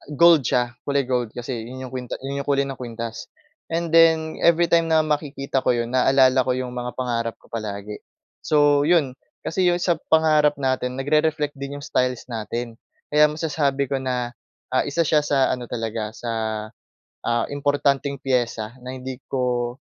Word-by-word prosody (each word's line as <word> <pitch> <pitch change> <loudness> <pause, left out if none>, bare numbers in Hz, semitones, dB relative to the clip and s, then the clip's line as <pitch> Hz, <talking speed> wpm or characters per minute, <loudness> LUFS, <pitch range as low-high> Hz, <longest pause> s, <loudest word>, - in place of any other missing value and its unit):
gold 170 -1 +6
siya, 120 -1 0
kulay 140 0 +2
gold 125 -3 -1
kasi, 120 -1 -4
yun 130 +1 -8
yung - - -12
kwinta 125 -2 -5
yun 140 +1 -3
yung - - -25
kulay 140 -1 +2
ng 135 - -7
kwintas. 115 -2 -6 0.4
And 165 0 -1
then, 160 -1 +4
everytime 170 0 +4
na 160 - +5
makikita 145 -3 -1
ko - - +3
'yon, 120 0 -2
naalala 130 0 +4
ko - - +3
yung 125 -1 -3
mga 125 0 -3
pangarap 115 -3 -2
ko - - -22
palagi. 105 -2 -5 0.4
So 145 -1 +4
'yon, 155 -7 +3 0.3
kasi 180 +2 +1
yung 175 0 +2
sa 175 -2 +2
pangarap 155 -2 +4
natin, 130 -1 -1
nagre-reflect 150 +1 +1
din 140 +1 -5
yung 145 - -9
styles 125 -1 0
natin. 115 +1 -4 0.4
Kaya 150 0 +6
masasabi 150 -3 -1
ko 135 - +1
na, 125 -2 -2 0.4
ah, 130 - +2
isa 165 +4 +1
siya 155 -1 +3
sa 140 -2 +2
ano 125 -1 -3
talaga, 110 -2 -3
sa, 115 0 -5 1.0
ah, 120 -1 +1
importanteng 140 -1 0
piyesa 120 -3 -1
na 130 +1 -6
hindi 130 0 -6
ko 125 -2 -1
135 Hz, 170 wpm, -23 LUFS, 120-150 Hz, 1.0 s, gold